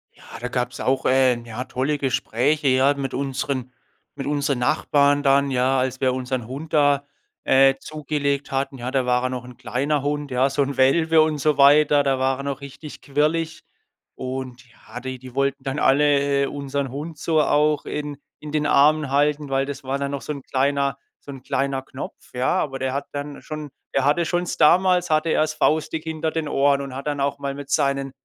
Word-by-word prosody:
Ja, - - -19 0.2
da 125 - -4
gab's 125 0 -3
auch, 130 0 0
äh, 130 -1 +4
ja, 115 +1 -6
tolle 135 +4 -1
Gespräche, 135 +2 0
ja, 130 +2 +4
mit 135 -2 -4
unseren 135 -1 -3 0.4
mit 135 -2 -5
unseren 140 -2 0
Nachbarn 145 +3 +2
dann, 140 0 +3
ja, 130 0 +2
als 130 +1 -2
wir 130 -1 +2
unseren 130 -2 -3
Hund 140 +7 -8
da, 145 -2 +3 0.4
äh, 135 0 +5
zugelegt 145 -2 -3
hatten. 135 0 -2
Ja, 125 +1 -4
da 130 -2 +1
war 125 0 +1
er 130 - 0
noch 125 -1 -5
'n 125 0 -12
kleiner 140 +5 -1
Hund, 145 0 -2
ja, 130 +2 +2
so 135 +1 0
'n 140 0 -1
Welpe 160 +5 +4
und 155 -1 +1
so 150 +1 +1
weiter. 145 +1 +6
Da 135 -2 +1
war 130 0 +1
er - - -5
noch 140 -1 -3
richtig 140 +2 -10
quirlig. 155 +3 -1 0.5
Und 130 -1 -6
ja, 115 0 -11
die 130 +1 -6
die 130 0 -12
wollten 140 0 0
dann 135 +2 -3
alle, 140 0 +3
äh, - - +2
unseren 140 -1 -3
Hund 150 +4 -6
so 160 +1 +1
auch 150 +1 +2
in 150 -1 -4 0.2
in 150 - -7
den 150 0 0
Armen 150 +1 +4
halten, 145 +1 +1
weil 135 0 +1
das 140 0 -7
war 135 +1 -1
dann 140 0 -2
noch 140 -1 -4
so 150 - -4
'n 140 - -8
kleiner 140 0 0 0.2
so 140 - -10
'n 135 - -10
kleiner 135 0 -1
Knopf, 130 0 -10
ja. 125 +1 0
Aber 135 -5 -2
der 130 0 -1
hat 140 - -3
dann 145 0 -6
schon 155 -1 -7 0.3
der 135 - +2
hatte 150 +4 +2
schon 175 +1 -1
damals 180 +3 +4
hatte 155 +1 +2
er's 155 0 +1
faustdick 155 +1 0
hinter 160 0 -3
den 160 -2 -3
Ohren 140 0 +2
und 135 -2 -7
hat 135 +3 -6
dann 145 -1 -1
auch 140 0 -1
mal 140 -1 -3
mit 140 -1 -9
seinen 140 -2 0
140 Hz, 205 wpm, -22 LUFS, 130-150 Hz, 0.5 s, weiter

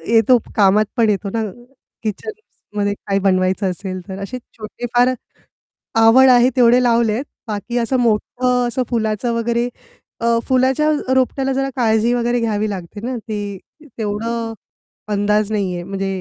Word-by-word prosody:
येतो 235 +3 +6 0.2
कामात 205 +1 +4
पण 225 -2 +3
येतो 200 -1 -1
ना 225 -1 0 0.6
किचनमध्ये 210 - -4
काही 195 0 +1
बनवायचं 185 0 +1
असेल 185 +1 -5
तर. 190 +1 -6
असे 250 +5 -5 0.2
छोटे 215 +2 -7
फार 250 +1 +4 0.9
आवड 255 +4 +7
आहे 245 0 +6
तेवढे 245 0 +5
लावलेत 235 +1 +2 0.2
बाकी 220 +3 -3
असं 245 +3 0
मोठं 245 +2 +1
असं 250 +2 -1
फुलाचं 225 0 -1
वगैरे 235 +1 0 0.5
अ, 235 0 +2
फुलाच्या 265 +4 +2 0.3
रोपट्याला 265 +1 +1
जरा 270 +1 -1
काळजी 230 -1 +2
वगैरे 240 0 +1
घ्यावी 215 -1 0
लागते 190 +1 -6
ना, 250 -1 -3
ती 205 -3 -5 0.4
तेवढं 225 +2 -3 0.6
अंदाज 210 +1 +1
नाही 195 -4 -1
आहे, 175 - -5
म्हणजे 195 +1 -4
225 Hz, 140 wpm, -19 LUFS, 205-245 Hz, 0.9 s, आवड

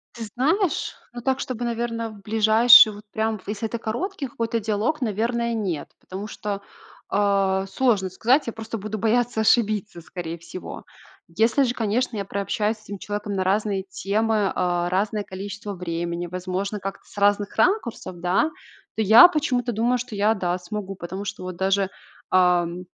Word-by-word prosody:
Ты 230 -1 -5
знаешь, 325 - +1 0.2
ну 240 - -7
так, 265 +1 0
чтобы, 245 -2 -4
наверно, 230 -1 -2
в 205 -2 -13
ближайший, 220 +2 +7
вот 205 +1 -12
прям, 220 -1 -1
в - - -21
если 210 +2 -3
это 235 - -3
короткий 275 - -3
какой-то 230 -1 -2
диалог, 220 +8 -1
наверное, 235 +1 -1
нет, 190 -9 -3
потому 195 +3 -7
что, 205 -2 -5 0.5
а, 195 -1 +1
сложно 205 -5 +1
сказать. 240 - +2
Я 230 - -3
просто 225 0 -6
буду 215 +2 -5
бояться 230 +1 +1
ошибиться, 215 -4 +1
скорее 170 0 -6
всего. 180 +2 -9 0.5
Если 225 +8 +3
же, 245 -1 0
конечно, 230 0 -1
я 200 - -3
прообщаюсь 210 +2 -1
с 215 - -22
этим 200 -1 -7
человеком 205 +1 -4
на 190 - 0
разные 200 0 0
темы, 205 +2 0
а, 175 -1 0
разное 205 +3 0
количество 200 +2 -7
времени, 170 -1 -3
возможно, 185 +3 -3
как-то 195 0 -6
с - - -18
разных 205 0 +2
ракурсов, 360 - 0
да, 180 - +2 0.5
то - - 0
я 220 - +9
почему-то 260 -7 0
думаю, 235 +3 +1
что 240 -2 -6
я, 210 +2 +3
да, 180 -3 -1
смогу. 195 +2 -6
Потому 190 +2 -6
что 200 - -6
вот 185 -1 -5
даже, 195 +1 +1 0.4
ам, 180 -1 +3
210 Hz, 165 wpm, -24 LUFS, 190-230 Hz, 0.5 s, я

